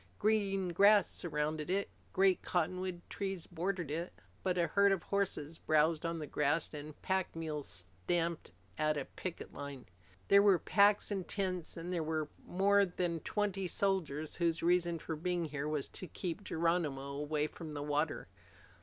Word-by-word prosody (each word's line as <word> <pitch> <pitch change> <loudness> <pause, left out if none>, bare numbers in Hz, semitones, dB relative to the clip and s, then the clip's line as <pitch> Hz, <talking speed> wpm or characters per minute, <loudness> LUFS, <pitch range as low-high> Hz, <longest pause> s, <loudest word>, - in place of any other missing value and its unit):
Green 200 -3 +1
grass 200 +3 +6
surrounded 155 -1 -2
it. 195 +2 +1 0.2
Great 190 -1 +4
cottonwood 180 +1 -1
trees 195 -3 -3
bordered 175 -2 -2
it. 170 +3 -3 0.3
But 180 -1 0
a 170 - +3
herd 200 +2 +4
of 190 -4 0
horses 170 -6 -1
browsed 155 +1 +2
on 165 0 -2
the 155 - -4
grass, 150 +3 0
and 150 0 -8
pack 190 -2 0
mules 155 -3 -4 0.4
stamped 170 -1 0 0.3
at 155 0 +2
a 140 - -2
picket 185 -2 -7
line. 140 -3 -7 0.4
There 200 0 +7
were 200 -3 +6
packs 205 +3 +4
and 195 -3 -2
tents, 185 -5 -2
and 175 +2 -4
there 170 - 0
were 155 -1 -1 0.2
more 200 +2 +4
than 175 -3 -1
twenty 195 +1 -1
soldiers 165 -6 0
whose 170 -1 +1
only 175 +1 +5
reason 175 -1 +1
for 160 0 -4
being 175 +2 -1
here 145 -1 -3
was 150 -3 -1
to 185 - -8
keep 180 +4 -4
Geronimo 160 -6 0
away 150 +1 -1
from 155 0 -7
the 145 -1 -4
water. 150 +1 -1
170 Hz, 165 wpm, -34 LUFS, 155-190 Hz, 0.4 s, There